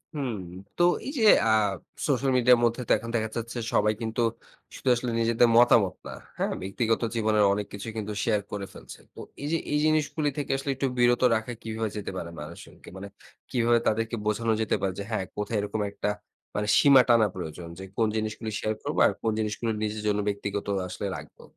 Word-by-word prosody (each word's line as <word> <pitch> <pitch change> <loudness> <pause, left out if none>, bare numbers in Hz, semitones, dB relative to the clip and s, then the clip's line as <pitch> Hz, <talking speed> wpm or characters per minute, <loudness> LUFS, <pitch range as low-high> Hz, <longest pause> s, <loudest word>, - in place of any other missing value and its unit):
হুম। 130 -6 -2 0.4
তো 175 - +3 0.2
এই 275 - -3
যে - - +2 0.2
আ - - +3 0.6
সোশ্যাল 135 0 +1
মিডিয়ার 125 -1 +5
মধ্যে 120 +1 +1
তো - - -1
এখন 115 - -8
দেখা 110 -1 0
যাচ্ছে, 115 +1 -5 0.2
সবাই 105 +1 +3
কিন্তু 115 +1 -2 0.5
শুধু 130 - -2
আসলে 120 0 -3
নিজেদের 115 +1 +4
মতামত 115 -6 +5
না। - - -6 0.3
হ্যাঁ, - - -1
ব্যক্তিগত 110 +4 0
জীবনের 110 -2 +2
অনেক 105 +1 -2
কিছুই 100 +3 -6
কিন্তু 105 -1 -3
শেয়ার 105 -3 +1
করে 100 -1 -4
ফেলছে। - - -11
তো - - -13 0.2
এই 145 - -3
যে, 165 - +2
এই 150 - +2
জিনিসগুলো 155 -1 +1
থেকে 145 - -2
আসলে 135 +1 -2
একটু 135 +1 -1
বিরত 120 0 +4
রাখা 110 +2 -3
কিভাবে 110 0 -3
যেতে 105 - -4
পারে 85 - -5
মানুষকে 75 +3 -11
মানে 100 +1 -7 0.4
কিভাবে 120 -2 +3
তাদেরকে 115 +2 0
বোঝানো 110 +2 0
যেতে 110 - +1
পারে 95 -1 0
যে - - -3
হ্যাঁ, 110 -4 -1
কোথায় 105 +2 -2
এরকম 105 +1 -3
একটা 105 - -2 0.5
মানে 105 0 -1
সীমা 140 -2 +7
টানা 115 -3 +5
প্রয়োজন 85 -1 -6
যে, - - -7
কোন 115 - +3
জিনিসগুলো 110 +1 -3
শেয়ার 110 - -1
করবো - - -2
আর - - +1
কোন 110 - +1
জিনিসগুলো 110 +1 -1
নিজের 105 0 -2
জন্য 105 0 +1
ব্যক্তিগত 100 0 -3 0.2
আসলে 90 - -5
রাখবো? - - -13
110 Hz, 195 wpm, -27 LUFS, 105-120 Hz, 0.6 s, সীমা